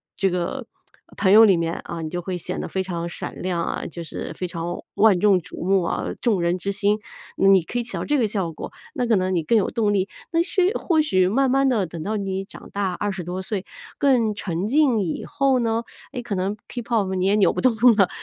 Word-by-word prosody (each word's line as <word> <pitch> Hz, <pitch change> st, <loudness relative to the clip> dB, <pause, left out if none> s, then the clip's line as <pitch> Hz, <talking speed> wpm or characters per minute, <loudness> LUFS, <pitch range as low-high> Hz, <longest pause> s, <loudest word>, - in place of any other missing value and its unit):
这 195 Hz, -, +1 dB
个 180 Hz, +9 st, -3 dB, 0.5 s
朋 190 Hz, -, +3 dB
友 220 Hz, +2 st, +9 dB
里 195 Hz, -3 st, +5 dB
面 165 Hz, 0 st, -1 dB
啊， 170 Hz, -1 st, -5 dB
你 160 Hz, -, -4 dB
就 175 Hz, +2 st, -3 dB
会 180 Hz, +1 st, -4 dB
显 175 Hz, -, -5 dB
得 -, -, -4 dB
非 190 Hz, -, -2 dB
常 170 Hz, -2 st, -4 dB
闪 -, -, -7 dB
亮 175 Hz, -2 st, -1 dB
啊， -, -, -3 dB
就 170 Hz, 0 st, -7 dB
是 155 Hz, -, -6 dB
非 185 Hz, -, -3 dB
常 170 Hz, 0 st, -4 dB, 0.2 s
万 210 Hz, -3 st, +5 dB
众 200 Hz, -1 st, +4 dB
瞩 170 Hz, -, -9 dB
目 190 Hz, +1 st, +3 dB
啊， -, -, -2 dB, 0.2 s
众 215 Hz, -7 st, +2 dB
人 170 Hz, +1 st, +1 dB
之 185 Hz, +2 st, -4 dB
星， 205 Hz, +2 st, +1 dB, 0.4 s
你 195 Hz, -2 st, +5 dB
可 240 Hz, +8 st, -3 dB
以 -, -, -1 dB
起 240 Hz, -, -8 dB
到 -, -, -2 dB
这 295 Hz, -, +1 dB
个 235 Hz, -5 st, +2 dB
效 195 Hz, -5 st, -2 dB
果， 155 Hz, -, -8 dB, 0.2 s
那 245 Hz, -, -1 dB
可 230 Hz, -, +4 dB
能 185 Hz, 0 st, 0 dB
你 175 Hz, -, +1 dB
更 225 Hz, +9 st, +3 dB
有 205 Hz, -, +1 dB
动 215 Hz, -3 st, +1 dB
力， 195 Hz, -1 st, 0 dB, 0.2 s
那 330 Hz, 0 st, +3 dB
许 370 Hz, +2 st, +1 dB
或 320 Hz, -4 st, +2 dB
许 185 Hz, -12 st, +2 dB
慢 265 Hz, +6 st, +2 dB
慢 270 Hz, +1 st, +3 dB
地 220 Hz, -7 st, +1 dB
等 165 Hz, 0 st, -7 dB
到 215 Hz, +5 st, -2 dB
你 195 Hz, -1 st, -3 dB
长 205 Hz, -, -12 dB
大 200 Hz, -2 st, 0 dB
20 190 Hz, -1 st, -3 dB
多 180 Hz, +2 st, -4 dB
岁 195 Hz, 0 st, -4 dB, 0.3 s
更 240 Hz, -6 st, +2 dB
沉 185 Hz, -1 st, -3 dB
静 270 Hz, -2 st, +3 dB
以 175 Hz, -5 st, -3 dB
后 275 Hz, -3 st, +1 dB
呢， 230 Hz, -1 st, 0 dB, 0.3 s
诶， 250 Hz, -, -4 dB
可 235 Hz, -4 st, -4 dB
能 190 Hz, +3 st, -2 dB
k-pop 225 Hz, -6 st, -1 dB
你 185 Hz, 0 st, 0 dB
也 200 Hz, +2 st, +3 dB
扭 205 Hz, -2 st, +4 dB
不 -, -, -2 dB
动 255 Hz, -, +4 dB, 0.2 s
了， 195 Hz, -4 st, +4 dB
195 Hz, 265 characters per minute, -23 LUFS, 180-230 Hz, 0.5 s, 友